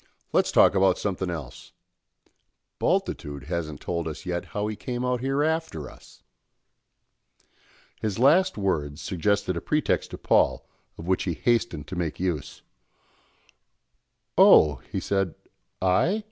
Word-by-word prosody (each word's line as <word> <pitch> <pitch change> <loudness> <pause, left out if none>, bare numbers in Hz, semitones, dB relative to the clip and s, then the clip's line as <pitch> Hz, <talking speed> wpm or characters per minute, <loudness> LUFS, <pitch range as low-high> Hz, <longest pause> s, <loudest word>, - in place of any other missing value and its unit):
Let's - - +3
talk - - +6
about 95 -1 +3
something 95 -2 -2
else. 75 -7 -7 1.1
Bultitude 70 -3 -1
hasn't 80 -2 -4
told 85 -2 -3
us 80 - -7
yet 90 -1 -3
how 105 0 -3
he 105 0 -3
came 125 +2 -4
out 125 -1 0
here 135 +2 0
after 160 - -2
us." - - -18 1.8
His 105 -3 -2
last 150 +9 +4
words 80 -7 -1
suggested 95 +1 0
a 85 - -3
pretext 150 -1 0
to - - -7
Paul, - - +2 0.3
of 80 - -8
which 95 +1 0
he 85 -4 -1
hastened 115 -11 0
to 95 - -7
make 85 -3 -3
use. 85 -6 -3 1.8
"Oh," 75 -2 +7
he - - -1
said, 95 -4 -1 0.5
"I? 160 - +2
95 Hz, 130 wpm, -26 LUFS, 80-115 Hz, 1.8 s, Oh